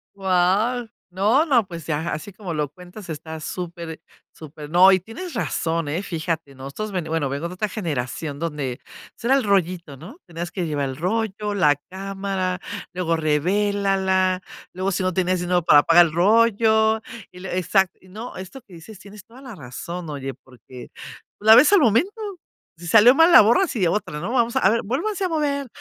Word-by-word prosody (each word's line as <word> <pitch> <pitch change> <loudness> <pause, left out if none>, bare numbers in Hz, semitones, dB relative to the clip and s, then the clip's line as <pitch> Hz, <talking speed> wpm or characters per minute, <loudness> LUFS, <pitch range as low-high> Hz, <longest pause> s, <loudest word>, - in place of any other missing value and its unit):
Guau. 195 +6 +1 0.2
No, 215 - +2
no, 245 -9 +3
pues 170 -4 -8
ya, 160 +1 -2
así 200 +7 -6
como 190 -5 -6
lo 150 -2 -2
cuentas 180 +4 -13
está 160 +1 -7
súper 170 -2 -6 0.3
súper. 150 -1 -11
No, 185 +3 +6
y 190 - +4
tienes 260 - -9
razón, 165 -8 -2
eh, 165 +7 -3
fíjate, 160 -5 -4
nosotros 140 +11 -6
ve 180 - -1
bueno, 160 -3 -2
vengo 140 +5 -3
de - - -8
otra 210 +2 -2
generación 150 - -4
donde, 150 -6 -4 0.3
pues, - - -19
era 265 +3 +4
el 270 - +1
rollito, 180 -6 0
¿no? 200 - -12
Tenías 170 +1 -6
que 180 -3 -3
llevar 145 -2 -2
el 130 - -6
rollo, 210 +3 -2
la 150 -7 +3
cámara, 190 -1 -3 0.3
luego 170 -2 -1
revélala, 190 +3 +1 0.3
luego, 190 +2 -2
si 185 - -1
no 185 -1 0
tienes 185 0 0
dinero 175 0 +1
para 145 -3 +6
pagar 170 +1 +6
el - - -7
rollo 220 +3 +3 0.3
y 180 - -13
lue 185 -1 -5
exacto. 190 +1 +1
No, 220 +6 -8
esto 190 +8 -9
que 185 - -17
dices, 185 +5 -12
tienes 205 +1 -13
toda 245 +3 -16
la 255 -4 -10
razón. 155 +5 -7
Oye, 135 -2 -5
porque 125 0 -13 0.5
la 220 +2 +7
ves 285 +10 +6
al 400 - +7
momento, 235 - +3 0.7
si 175 0 -10
salió 225 +6 +7
mal, 325 +2 +5
la - - +10
borras 240 - +3
y 190 -5 +1
otra 165 -5 -2
no 180 +8 -4
vamos 235 -2 +1
a - - +3
a 190 - +4
ver, 230 +2 +1
vuélvanse 370 - -2
a - - -1
mover, 285 -4 -1
185 Hz, 190 wpm, -22 LUFS, 165-220 Hz, 0.7 s, la